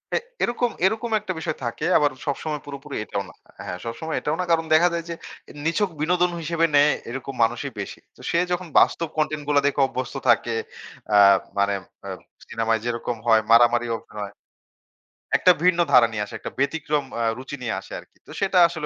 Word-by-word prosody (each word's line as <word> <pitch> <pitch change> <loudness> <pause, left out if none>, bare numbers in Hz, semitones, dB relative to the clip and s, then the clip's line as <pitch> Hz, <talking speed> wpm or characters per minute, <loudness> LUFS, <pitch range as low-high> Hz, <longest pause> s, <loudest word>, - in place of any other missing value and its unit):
এ - - +4 0.3
এরকম, 240 0 +1 0.2
এরকম 225 +4 0
১ 210 - -6
টা 185 - -1
বিষয় - - -3
থাকে। 120 - -3
আবার 145 -1 +2
সবসময় 150 +1 -3
পুরোপুরি 140 0 -8
এটাও 100 -2 -3
না। - - -14 0.3
হ্যাঁ, 90 - -4
সবসময় 160 +8 -4
এটাও 150 +2 -1
না, 180 - 0
কারণ 165 -1 +2
দেখা 170 +3 +6
যায় 170 -1 -2
যে, - - -2 0.5
নিছক 185 +5 +1
বিনোদন 180 +2 +2
হিসেবে 165 +1 +1
নেয়, 145 +1 +6 0.2
এরকম 135 +2 -6
মানুষই 115 - -1
বেশি। - - -6 0.2
তো - - -16
সে 170 - +2
যখন 180 0 -2
বাস্তব 165 - +2
Content 155 -1 0
গুলা 145 -1 +4
দেখে 145 - -1
অভ্যস্ত 130 0 -5
থাকে, 115 0 +3 0.6
আ - - +7 0.4
মানে 100 0 +2 0.3
অ - - -5 0.4
সিনেমায় 115 -1 0
যেরকম 120 0 -2
হয় 110 -1 +6
মারামারি 120 0 +5
অভিনয় 105 -2 -8 1.1
একটা 180 - +6
ভিন্ন 180 -1 +4
ধারা 120 -3 +7
নিয়ে 105 -2 -2
আসে, - - -13
একটা - - -6
ব্যতিক্রম 150 0 0 0.2
আ 115 - 0
রুচি 135 +2 -7
নিয়ে 120 - -2
আসে - - -15
আরকি। - - -19
তো - - -12
সেটা 195 -1 +1
আসলে 165 -3 -5
145 Hz, 190 wpm, -23 LUFS, 120-170 Hz, 1.1 s, আ